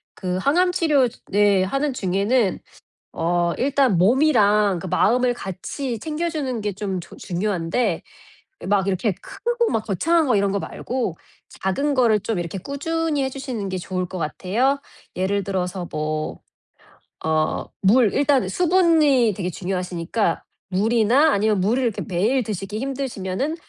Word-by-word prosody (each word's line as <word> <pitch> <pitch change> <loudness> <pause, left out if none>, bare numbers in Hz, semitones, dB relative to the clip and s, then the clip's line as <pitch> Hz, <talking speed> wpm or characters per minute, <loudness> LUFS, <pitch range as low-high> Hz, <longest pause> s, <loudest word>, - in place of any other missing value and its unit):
그 185 -1 -3
항암치료 305 - +2 0.2
네 200 -2 +4
하는 275 +8 -1
중에는 200 +1 +1 0.5
어 170 +1 0
일단 265 -7 +2
몸이랑 210 - +4
그 185 - -6
마음을 245 +7 +2
같이 230 +4 -5
챙겨주는 300 -5 -3
게 205 -1 -2
좀 195 -2 -3
저 - - -13
중요한데 180 +1 -1 0.6
막 200 -1 +2
이렇게 195 +2 0
크고 475 0 -1
막 220 -1 -1
거창한 315 - +2
거 245 - +3
이런 200 -1 +2
거 200 - 0
말고 240 -9 -4 0.5
작은 280 +10 0
거를 230 -4 +4
좀 215 -1 -2
이렇게 175 +3 -4
꾸준히 295 - -2
해 265 - -1
주시는 255 -7 -5
게 185 - -3
좋을 185 0 -3
것 185 - -7
같아요. 225 - 0 0.4
예를 195 +2 0
들어서 180 -2 -3
뭐 155 0 -3 0.9
어 155 0 0 0.2
물. 215 +2 +4
일단 275 -8 +2
수분이 315 - +3
되게 180 -2 -2
중요하시니까 180 +2 -2 0.3
물이나 230 +9 +3
아니면 210 -1 +2
물을 230 +8 +1
이렇게 230 -4 -1
매일 215 +8 +1
드시기 205 0 -4
힘드시면은 265 - -3
210 Hz, 290 characters per minute, -22 LUFS, 185-270 Hz, 0.9 s, 네